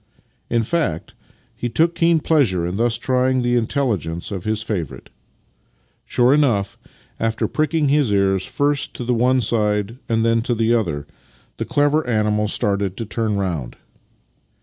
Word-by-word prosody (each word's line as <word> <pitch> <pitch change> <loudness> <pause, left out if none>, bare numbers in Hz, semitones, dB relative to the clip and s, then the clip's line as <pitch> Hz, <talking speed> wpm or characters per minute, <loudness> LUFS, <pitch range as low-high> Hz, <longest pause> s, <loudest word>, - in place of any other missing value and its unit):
In 115 -1 +1
fact, 110 - -2 0.4
he 120 - -3
took 165 +7 +2
keen 165 -1 +2
pleasure 120 - +2
in 90 +3 -3
thus 120 +1 +2
trying 130 +1 +1
the 120 0 +1
intelligence 110 - -1
of 95 0 -5
his 110 0 -1
favourite. 85 - -5 1.0
Sure 125 +2 +3
enough, 120 -10 +1 0.4
after 115 0 0
pricking 155 0 0
his 140 -5 +2
ears 95 -1 +2
first 145 +4 -1
to - - -5
the 125 +1 0
one 125 +2 +2
side 105 0 0
and 115 0 +1
then 115 0 +2
to 120 +1 -1
the 115 +1 +2
other, 85 -11 -1 0.5
the - - -3
clever 145 +2 +2
animal 105 -2 +1
started 100 -2 -1
to 115 - -3
turn 110 -1 -1
round. 85 -11 -3
115 Hz, 150 wpm, -20 LUFS, 100-130 Hz, 1.0 s, Sure